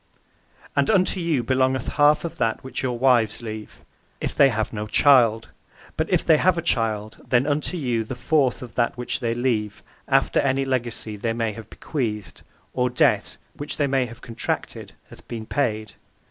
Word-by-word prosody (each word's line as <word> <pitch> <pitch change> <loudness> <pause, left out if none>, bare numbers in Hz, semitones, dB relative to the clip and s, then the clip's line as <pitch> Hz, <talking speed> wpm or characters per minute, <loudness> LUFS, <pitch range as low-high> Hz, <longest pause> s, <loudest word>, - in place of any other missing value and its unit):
P: - - -38 0.6
And - - +3
unto 190 -2 +2
you 165 -7 0
belongeth 130 +1 +1
a - - -6
half 150 +2 +4
of 170 - -6
that 115 -1 0
which 130 - -5
your 125 -2 -2
wives 120 -3 +2
leave, 110 -1 -8 0.4
if - - -3
they 140 - +5
have 110 -2 -2
no 105 0 -4
child; 115 -2 +4 0.5
but - - -1
if - - +1
they 160 -2 +6
have 180 +2 +3
a - - 0
child 110 -7 -1
then 125 +1 +3
unto 150 +4 -1
you 120 -7 -1
the 120 +4 -6
fourth 130 0 +1
of 120 - -10
that 120 0 0
which 125 - -3
they 115 -1 -1
leave, 110 -4 -1 0.2
after 135 0 +2
any 135 0 +1
legacy 120 -4 -3
they 115 +2 -1
may 115 -1 -1
have 110 0 -10
bequeathed, 105 - -4 0.3
or 125 0 +1
debt 125 - +1 0.4
(they 145 - +2
may 135 -2 +1
have 115 +1 -13
contracted, 115 -2 -4 0.2
hath - - -15
been 115 -2 -6
paid). 110 -5 -2
120 Hz, 185 wpm, -23 LUFS, 110-135 Hz, 0.6 s, they